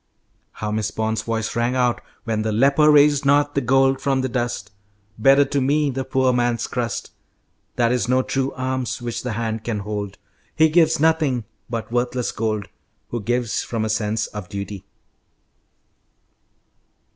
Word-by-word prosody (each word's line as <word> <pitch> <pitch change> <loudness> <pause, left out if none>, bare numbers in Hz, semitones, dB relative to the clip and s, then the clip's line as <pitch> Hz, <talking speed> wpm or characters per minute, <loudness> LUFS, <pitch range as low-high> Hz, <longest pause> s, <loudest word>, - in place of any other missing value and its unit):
How 105 0 -4
Miss 105 -1 -1
Bond's 110 0 -2
voice 115 -1 -3
rang 120 +2 0
out 125 -2 +1 0.2
when 110 -2 -1
"the 110 0 -1
leper 140 +7 +4
raised 145 -1 +5
not 145 +1 +3
the 140 - +1
gold 135 +1 +3
from 135 -1 +1
the 130 - -2
dust." 120 -4 -3 0.5
"Better 135 +4 +6
to 140 0 -1
me 145 +2 +2
the 135 +1 -3
poor 130 -1 +1
man's 120 -1 +1
crust. 120 -2 -3 0.6
That 120 -1 +2
is 125 -2 0
no 130 0 +3
true 135 +1 -1
alms 130 -1 -2
which 120 -1 -4
the 125 -3 -3
hand 110 0 -3
can 110 -3 -2
hold. 100 -1 -5 0.4
He 160 0 +5
gives 160 -1 +3
nothing 155 -6 +2 0.3
but 115 -1 -4
worthless 125 0 -1
gold 110 -2 -2 0.4
Who 120 - -3
gives 120 -1 -1
from 115 -2 -3
a - - -2
sense 110 0 0
of 105 -3 -8
duty." 100 -1 -6
120 Hz, 160 wpm, -22 LUFS, 110-135 Hz, 0.6 s, Better